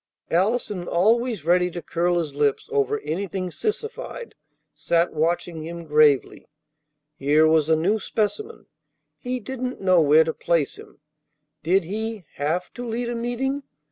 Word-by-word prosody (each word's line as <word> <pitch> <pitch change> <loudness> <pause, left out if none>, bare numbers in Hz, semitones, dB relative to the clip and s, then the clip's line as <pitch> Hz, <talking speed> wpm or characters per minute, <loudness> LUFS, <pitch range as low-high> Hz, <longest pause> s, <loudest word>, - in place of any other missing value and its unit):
Allison, 195 0 0
always 220 - +1
ready 180 +1 +3
to 175 - -6
curl 175 +1 0
his 160 -4 -2
lips 145 -1 0
over 435 0 +1
anything 185 - -3
sissified, 445 - -4 0.4
sat 170 0 +1
watching 165 +1 -1
him 170 +1 -7
gravely. 150 -3 +3 0.7
Here 150 +3 +3
was 160 -1 +3
a 160 - +5
new 190 +8 +1
specimen. 225 - -3 0.5
He 250 0 -3
didn't 255 +1 -5
know 185 -3 +4
where 155 +1 +6
to 160 0 -2
place 165 -5 0
him. - - -14 0.6
Did 180 +4 +2
he 215 +3 -4
have 160 +6 -2
to 245 - -7
lead 235 +1 -2
a 240 - -3
meeting? 245 +4 -2
180 Hz, 140 wpm, -24 LUFS, 160-235 Hz, 0.7 s, where